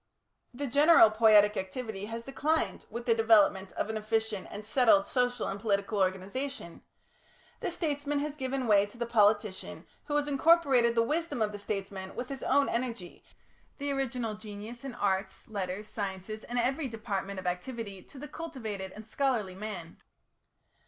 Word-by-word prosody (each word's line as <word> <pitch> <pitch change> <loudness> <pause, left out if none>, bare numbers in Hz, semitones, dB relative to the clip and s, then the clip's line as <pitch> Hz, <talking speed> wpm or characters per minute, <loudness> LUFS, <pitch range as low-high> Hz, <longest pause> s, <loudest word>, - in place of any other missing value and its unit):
The 275 +3 -4
general 285 -3 +6
poietic 215 -1 +6
activity 200 +1 -4
has 230 +2 -6
declined 295 +5 -1
with 235 0 -6
the 235 - +4
development 210 -4 +4
of - - -2
an 220 0 -3
efficient 215 -2 -1
and 205 +1 -7
settled 260 +5 +4
social 250 -5 0
and 195 - -4
political 200 0 0
organisation; 190 +3 -2 0.8
the - - -2
statesman 295 -4 -2
has 290 0 -2
given 265 -2 -2
way 205 -2 +4
to 205 - -15
the 235 - -2
politician 210 -3 +1 0.2
who 295 - -2
has 295 0 +1
incorporated 275 -5 +4
the 230 - +4
wisdom 315 +2 -1
of 215 -1 +1
the 205 - -7
statesman 195 -2 -5
with 250 - -5
his 275 -1 -6
own 280 +1 +3
energy, 230 -7 -3 0.5
the 285 0 -2
original 250 -5 -2
genius 215 +3 -9
in 270 -3 -6
arts, 190 -1 -1
letters, 200 -1 -4
science, 195 -2 -5
and 220 +3 -5
every 265 +5 +1
department 200 -4 -4
of 185 - -9
activity 195 +2 -4
to 275 - -15
the 295 +3 -7
cultivated 225 - -6
and 215 - -10
scholarly 225 -5 0
man. 190 -4 -7
225 Hz, 160 wpm, -30 LUFS, 200-265 Hz, 0.8 s, general